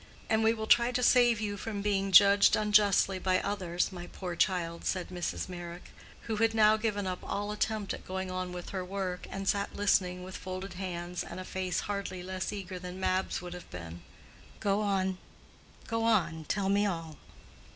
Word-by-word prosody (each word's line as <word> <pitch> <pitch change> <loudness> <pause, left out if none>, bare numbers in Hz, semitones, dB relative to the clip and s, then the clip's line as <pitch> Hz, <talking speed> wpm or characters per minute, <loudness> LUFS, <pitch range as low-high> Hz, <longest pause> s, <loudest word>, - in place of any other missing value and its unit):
"And 220 0 +3
we 220 - +5
will 220 -1 -3
try 235 +2 +5
to 250 0 0
save 240 -2 +5
you 205 -1 -3
from 205 -1 -4
being 195 -1 0
judged 200 +1 +7
unjustly 205 -2 +3
by 185 0 +2
others, 185 -4 -1
my 175 -1 -7
poor 180 -2 -6
child," 170 -3 0
said 185 -2 -2
Mrs. 180 -1 -3
Meyrick, 175 -1 -8 0.3
who 220 -2 -3
had 225 +1 +2
now 215 -1 +6
given 215 -2 -1
up 185 -1 -3
all 205 +1 -3
attempt 210 -1 -1
at - - -8
going 190 0 -3
on 185 0 -3
with 180 -1 -7
her 190 -2 -3
work, 180 -1 -4
and 195 0 -5
sat 200 0 0
listening 180 -3 +1
with 185 0 -8
folded 185 +1 -6
hands 180 -1 -4
and 175 - -8
a 185 - -6
face 185 -1 -2
hardly 200 -3 -4
less 185 0 -3
eager 190 -3 -6
than 180 +1 -7
Mab's 185 -1 0
would 175 0 -6
have 180 - -10
been. 85 -1 -8 0.6
"Go 200 0 +1
on, 190 -2 0 0.7
go 225 0 -1
on: 170 -8 +1
tell 195 +4 0
me 205 +1 +3
all." 165 -5 -4
190 Hz, 190 wpm, -30 LUFS, 180-205 Hz, 0.7 s, judged